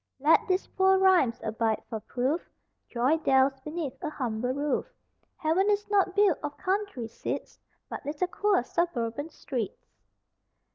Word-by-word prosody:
Let 300 +4 +4
these 370 0 +1
poor 380 0 +3
rhymes 370 -11 +4
abide 220 0 -1
for 220 - -4
proof 255 +9 -2 0.4
Joy 255 +6 +2
dwells 270 -3 +3
beneath 300 -1 -5
a 310 - -1
humble 245 -4 -2
roof; 285 - -1 0.5
Heaven 340 +6 +2
is 415 0 +1
not 385 -2 +3
built 405 -6 +4
of 290 -1 -5
country 380 - -2
seats 230 - -5 0.3
But - - -7
little 295 +5 -1
queer 395 -3 +1
suburban 285 -3 -2
streets! 250 - -5
295 Hz, 140 wpm, -28 LUFS, 250-370 Hz, 0.5 s, Let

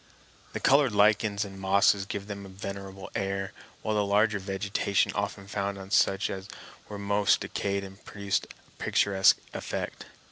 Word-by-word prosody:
The - - -3
colored 135 -4 +4
lichens 105 0 +3
and 95 -1 -9
mosses 100 0 +3
gave 100 -1 -4
them 100 -1 -6
a 100 - -10
venerable 95 0 -7
air, 95 0 -2 0.3
while 110 - 0
the 105 -1 +2
larger 105 +1 +2
vegetation 100 +1 0
often 100 -1 -3
found 100 0 -3
on 95 0 -10
such 100 -2 +3
as 95 0 -6 0.4
were 105 - -6
most 100 0 +2
decayed 100 -1 -3
produced 100 -1 -2
a - - -18
picturesque 95 -1 +4 0.2
effect. - - -4
100 Hz, 150 wpm, -28 LUFS, 95-100 Hz, 0.4 s, colored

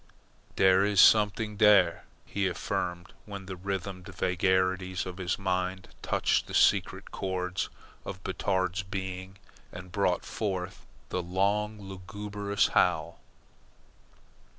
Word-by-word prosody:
"Dere 95 0 +5
is 100 -1 +2
somet'ing 105 +1 +5
dere," 100 -5 +5 0.2
he 100 -1 -1
affirmed, 90 0 -3
when 100 -2 -7
the 95 0 -6
rhythmed 95 0 -5
vagaries 95 0 0
of 90 -1 -7
his 90 -1 -1
mind 95 -1 -2
touched - - +1
the - - -5
secret - - +2
chords 90 -1 -2 0.3
of 95 - -7
Batard's 95 -1 -1
being 95 -1 -6 0.3
and 90 0 -9
brought 90 -2 +1
forth 95 -4 -4 0.2
the 90 - -1
long 100 +4 0
lugubrious 100 +1 -2
howl. 85 -2 +1
95 Hz, 110 wpm, -29 LUFS, 90-100 Hz, 0.3 s, Dere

